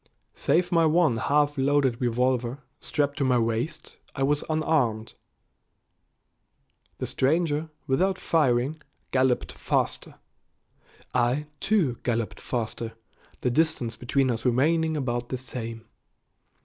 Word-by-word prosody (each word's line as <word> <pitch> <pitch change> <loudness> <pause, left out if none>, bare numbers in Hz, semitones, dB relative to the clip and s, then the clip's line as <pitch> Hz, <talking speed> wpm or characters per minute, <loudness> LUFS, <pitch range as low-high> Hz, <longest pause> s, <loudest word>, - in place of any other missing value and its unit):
Save 175 +1 +1
my 165 -1 +4
one 155 -6 +3
half 145 +3 +1
loaded 135 -3 +2
revolver, 125 +2 0 0.2
strapped 145 -2 -1
to - - +2
my 130 -2 +3
waist, 115 +7 -2 0.2
I 135 - -1
was 145 +2 +1
unarmed. 150 -9 0 1.8
The - - -3
stranger, 155 +2 +1 0.2
without 185 +8 +1
firing, 145 -2 +1 0.3
galloped 130 -1 +2
faster. - - -2 1.0
I, 125 +4 +1
too, 180 - +1
galloped 115 -2 -2
faster, 115 -1 -3 0.5
the 125 - +1
distance 155 -5 +1
between 130 +1 +1
us 115 -1 -3
remaining 155 +6 +2
about 120 -3 -2
the 130 - -2
same. 115 -3 -6
130 Hz, 110 wpm, -26 LUFS, 120-155 Hz, 1.8 s, my